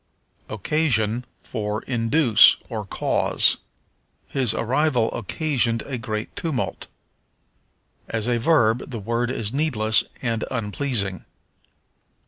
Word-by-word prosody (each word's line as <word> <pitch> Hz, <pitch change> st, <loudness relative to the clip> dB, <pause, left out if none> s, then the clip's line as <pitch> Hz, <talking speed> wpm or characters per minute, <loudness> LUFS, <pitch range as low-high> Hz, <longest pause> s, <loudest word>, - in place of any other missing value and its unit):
Occasion 120 Hz, -, 0 dB, 0.2 s
for 105 Hz, -2 st, -4 dB
Induce, 120 Hz, 0 st, +4 dB
or 110 Hz, -4 st, -5 dB
Cause. -, -, +4 dB, 0.7 s
"His 130 Hz, -5 st, 0 dB
arrival 125 Hz, -1 st, +1 dB
occasioned 115 Hz, -, -1 dB
a 130 Hz, -3 st, -5 dB
great 110 Hz, -1 st, -5 dB
tumult." 155 Hz, -7 st, -3 dB, 1.2 s
As 110 Hz, -2 st, -2 dB
a 120 Hz, -1 st, +1 dB
verb, 120 Hz, -4 st, +2 dB
the 120 Hz, -, -5 dB
word 115 Hz, +3 st, -2 dB
is 115 Hz, -3 st, -3 dB
needless 115 Hz, -8 st, +2 dB, 0.2 s
and 115 Hz, -3 st, -1 dB
unpleasing. 110 Hz, -4 st, -2 dB
115 Hz, 100 wpm, -23 LUFS, 110-130 Hz, 1.2 s, Induce